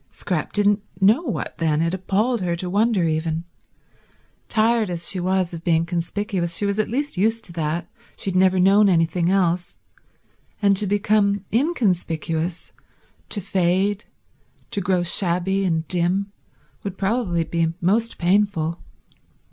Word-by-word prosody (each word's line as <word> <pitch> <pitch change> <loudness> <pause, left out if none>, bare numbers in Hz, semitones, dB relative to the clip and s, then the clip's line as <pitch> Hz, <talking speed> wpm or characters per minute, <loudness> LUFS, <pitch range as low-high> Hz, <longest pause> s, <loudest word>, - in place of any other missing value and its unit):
Scrap - - -3
didn't 205 0 +2 0.2
know 210 +9 +4
what 270 -11 -4
then, 155 -2 +1
it 165 +2 0
appalled 205 +5 0
her 175 -2 -1
to 180 +1 -4
wonder 210 -1 +2
even. 160 +1 -1 1.1
Tired 225 -1 +2
as 170 -1 -3
she 190 - 0
was 185 -1 0
of 165 0 -7
being 165 -1 +2
conspicuous 175 +1 -1
she 205 - +1
was 200 +1 -1
at 215 - +1
least 275 -1 -2
used 225 +4 +1
to 170 - -9
that, 165 +1 -2 0.3
she 195 - -3
had - - -6
never 185 0 +4
known 200 +2 +5
anything 170 0 +2
else; 180 -2 +1 0.8
and 200 -1 +3
to 205 +1 -1
become 205 0 +1
inconspicuous, 180 - -1 0.6
to 205 - +1
fade, 190 +2 0 0.7
to 200 - -1
grow 180 -1 +1
shabby 180 +2 +1
and 160 -3 -1
dim, 185 +3 +1 0.5
would 195 -2 -5
probably 195 -5 0
be 165 0 0
most 220 +6 +1
painful. 175 -3 +1
190 Hz, 145 wpm, -22 LUFS, 170-205 Hz, 1.1 s, known